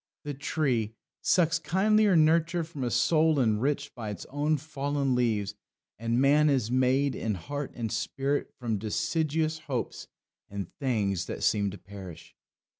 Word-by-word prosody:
"The 145 -1 -4
tree 130 -6 -1 0.3
Sucks 165 -2 +3
kindlier 200 +4 +3
nurture 165 +2 +3
from 155 -4 -6
a 120 - 0
soil 155 +6 +3
enriched 130 +5 +1
By 115 -4 -6
its 100 -4 -6
own 150 +2 +1
fallen 145 -2 -1
leaves; 110 -5 +1 0.5
and 115 +1 0
man 145 +3 +5
is 125 -5 +1
made, 130 +2 +2
In 110 -2 -2
heart 145 +10 -5
and 115 -3 -3
spirit, 135 +5 -1
from 115 -4 -2
deciduous 155 - 0
hopes 135 -6 -4 0.4
And 100 -3 -6
things 105 - 0
that - - -5
seem 100 -1 +2
to 100 - -8
perish." 95 -3 -11
135 Hz, 145 wpm, -28 LUFS, 110-155 Hz, 0.5 s, man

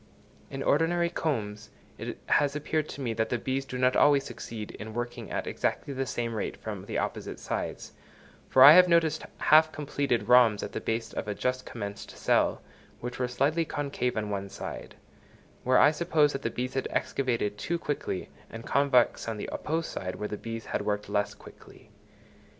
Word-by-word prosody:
In 135 0 -5
ordinary 170 +3 +2
combs 110 - -3 0.3
it - - -5
has 145 -1 +2
appeared 155 +1 -1
to 140 - -7
me 120 -4 -1
that 110 0 -1
the 120 - 0
bees 130 +3 -2
do 125 - -6
not 125 0 +3
always 145 -2 +5
succeed 115 -3 -7
in 110 0 -7
working 120 0 -4
at - - -3
exactly 140 - -2
the 135 0 -2
same 115 -1 -2
rate 110 - -3
from - - -6
the - - -3
opposite - - -3
sides; - - -4 0.6
for 130 - +7
I 140 - +12
have 180 +1 +8
noticed 165 -2 +2
half 155 +1 +5
completed 140 -7 -1
rhombs 120 -4 +5
at - - -5
the - - -4
base 115 0 -2
of - - -4
a 105 - -2
just 130 +4 -2
commenced 100 -3 -7
cell, - - +2 0.4
which 125 +1 -6
were 125 - +1
slightly 140 +7 +1
concave 140 -6 -2
on 105 -1 -2
one 100 -1 -3
side, 100 - -7 0.7
where 130 +1 +4
I 145 - +7
suppose 155 -2 +2
that 135 - -4
the 115 - -1
bees 125 +2 -4
had 135 - -1
excavated 115 -6 -1
too 170 - -1
quickly, 145 - -3 0.2
and 115 +1 -9
convex 135 -5 +2
on 115 -1 -3
the - - -5
opposed 160 +2 -2
side 90 -1 -4
where 105 - -4
the 105 - -4
bees 115 +1 -6
had - - -2
worked 105 -1 -2
less 105 0 0
quickly. - - -16
125 Hz, 190 wpm, -28 LUFS, 110-145 Hz, 0.7 s, I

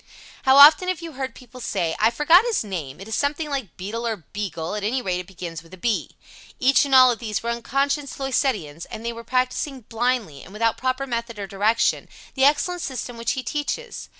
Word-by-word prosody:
How 265 +1 +6
often 305 +6 +9
have 370 -3 -1
you 330 - -6
heard 265 -3 -5
people 250 0 -13
say, 165 -7 -1
"I 220 - +5
forget 295 - +5
his 470 - 0
name, 165 -9 -6
it 195 - -9
is 220 - -5
something 295 +4 -1
like 265 - -4
Beadle 225 +6 -4
or 225 - -1 0.2
Beagle 185 -5 -4
at 210 -1 -4
any 235 +6 0
rate 185 -7 -2
it 180 - -8
begins 175 -4 -7
with 165 +3 -14
a - - -20
B." 225 +4 -2 0.4
Each 270 +3 +4
and 275 -1 +2
all 255 -1 +8
of 235 - -4
these 220 -3 -3
were 235 - -1
unconscious 275 +4 -1
Loisettians, 215 - -1
and 220 +1 -8
they 235 - -2
were 230 0 -9
practicing 255 +2 -1
blindly, 225 - -2
and 190 - -13
without 225 +1 +1
proper 255 +1 -1
method 235 -3 -4
or 200 - -4
direction, 205 +4 +1 0.2
the 265 0 +3
excellent 305 +5 +2
system 255 -3 -5
which 230 0 -1
he 260 - -4
teaches. 300 - -4
235 Hz, 215 wpm, -23 LUFS, 210-275 Hz, 0.4 s, often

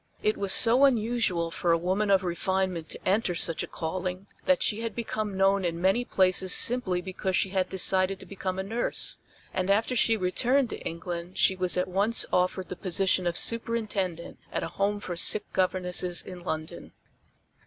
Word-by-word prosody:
It 215 - +2
was 200 -1 -1
so 240 +6 +5
unusual 220 -9 +1
for 170 +1 0
a 165 - +4
woman 190 +5 -1
of 195 -1 +3
refinement 185 -1 -2
to - - -5
enter 195 -2 +1
such 165 -1 +1
a - - -4
calling 185 +3 -4 0.2
that 275 -1 +3
she 215 - 0
had 230 -1 -4
become 215 -4 -4
known 195 0 +3
in 170 -1 -2
many 195 +7 +1
places 185 -2 +3
simply 205 -8 +2
because 185 0 -3
she 195 - +1
had 185 -1 -1
decided 190 0 +1
to - - -10
become 190 -1 -5
a 190 - -2
nurse; 225 +5 -2 0.3
and 185 0 -2
after 220 +5 +1
she 225 -1 +3
returned 240 +7 +1
to - - -6
England 170 +1 -6
she 190 - +4
was 185 -1 +1
at 180 - 0
once 200 +5 +2
offered 180 +1 0
the 180 - -5
position 185 0 0
of 170 - -1
Superintendent 215 -7 -1
at - - -3
a - - -4
Home 205 +1 -1
for 180 -3 -5
Sick 205 +5 +2
Governesses 180 -1 +1
in 185 -1 -9
London. 160 -2 -6
190 Hz, 185 wpm, -27 LUFS, 180-210 Hz, 0.3 s, so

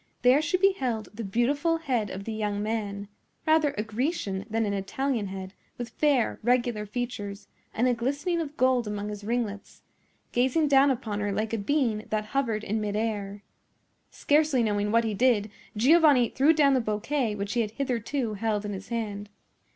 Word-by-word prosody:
There 255 +4 +6
she 310 +4 +1
beheld 265 - +1
the 230 +2 -6
beautiful 280 - +1
head 250 -10 -1
of 190 +1 -6
the 225 - -5
young 210 -1 -2
man—rather 220 +8 -1
a 210 - 0
Grecian 220 - -2
than 225 +1 0
an 200 - -1
Italian 210 +3 -2
head, 190 0 -7 0.2
with 240 -1 -5
fair, 280 -3 +1
regular 240 -2 +1
features, 205 -3 -5 0.2
and 240 +3 +1
a 250 - +3
glistening 285 +9 -1
of 300 -2 -6
gold 255 -3 +2
among 210 0 -3
his 210 -1 -7
ringlets—gazing 240 +5 -2
down 275 0 +6
upon 225 -6 -2
her 205 0 -1
like 215 +3 -2
a - - +1
being 225 -2 0
that 215 -1 -1
hovered 225 -3 -1
in 215 +1 -1
mid 205 -1 -2
air. 205 -2 -3 0.7
Scarcely 295 -4 +2
knowing 210 -1 0
what 230 +1 +4
he 220 -2 -1
did, 220 -2 +2 0.3
Giovanni 280 -1 +5
threw 280 +4 +4
down 295 -3 +4
the 260 - +3
bouquet 225 +2 -1
which 200 0 -3
he 240 - +2
had 215 - -1
hitherto 245 -1 -2
held 210 0 -1
in 205 - -3
his 195 0 -7
hand. 210 -3 -4
225 Hz, 175 wpm, -27 LUFS, 210-265 Hz, 0.7 s, There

